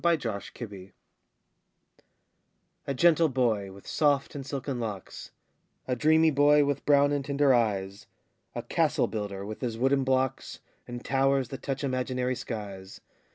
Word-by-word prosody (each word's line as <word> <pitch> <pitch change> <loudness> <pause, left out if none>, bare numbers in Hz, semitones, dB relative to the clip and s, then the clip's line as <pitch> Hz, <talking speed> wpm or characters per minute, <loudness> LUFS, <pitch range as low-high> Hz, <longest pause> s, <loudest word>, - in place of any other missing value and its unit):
THE 170 -1 +4
CASTLE 115 -1 -5
BUILDER 95 -2 -12 1.9
A 140 - -1
gentle 165 +2 +4
boy, 115 -7 0
with 100 +1 -14
soft 145 -3 +1
and 140 - -6
silken 135 -2 -4
locks 105 -5 -6 0.6
A 125 - 0
dreamy 160 +4 +4
boy, 145 +1 +5
with 140 -1 -2
brown 145 0 +5
and 145 -1 -1
tender 140 0 +2
eyes, 100 -4 -1 0.5
A - - -4
castle - - +1
builder, 100 -2 -5
with 110 +1 -7
his 120 -3 -3
wooden 135 +2 +2
blocks, 130 0 -1 0.3
And 120 0 -7
towers 135 -1 +1
that 135 - -7
touch 135 0 -3
imaginary 130 -1 -1
skies. 100 -6 -7
130 Hz, 145 wpm, -28 LUFS, 110-140 Hz, 1.9 s, boy